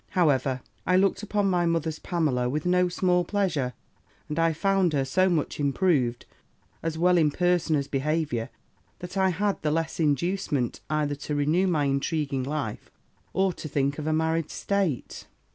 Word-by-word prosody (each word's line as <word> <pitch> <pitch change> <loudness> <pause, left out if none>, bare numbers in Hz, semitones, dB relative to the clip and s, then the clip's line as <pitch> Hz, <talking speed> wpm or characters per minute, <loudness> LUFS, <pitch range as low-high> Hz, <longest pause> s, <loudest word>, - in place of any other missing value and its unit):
However, 135 -6 +2 0.2
I 180 - +2
looked 195 +1 +2
upon 205 -1 0
my 175 -2 +2
mother's 160 -2 -1
Pamela 145 -9 0
with 150 +5 -2
no 180 0 +3
small 180 0 +2
pleasure, 175 -11 -1 0.5
and 150 +2 -3
I 165 0 +3
found 190 +1 +1
her 135 -2 +1
so 185 +8 +2
much 160 -4 -1
improved, 140 -5 +1 0.6
as 165 -1 -3
well 180 +1 +4
in 155 -2 +4
person 175 0 +1
as 140 -1 -1
behaviour, 140 -4 -1 0.5
that 180 +2 -8
I 190 -1 +3
had 200 +3 -1
the 150 - 0
less 160 +2 -1
inducement 150 -3 0
either 150 -1 0
to 145 +1 -4
renew 155 +6 +2
my 155 -5 +1
intriguing 140 0 -1
life, 140 -5 -4 0.4
or 190 -1 +1
to 160 - -7
think 140 0 -1
of 150 - -4
a - - +1
married 160 0 0
state. 195 -10 -2
160 Hz, 165 wpm, -26 LUFS, 145-180 Hz, 0.6 s, well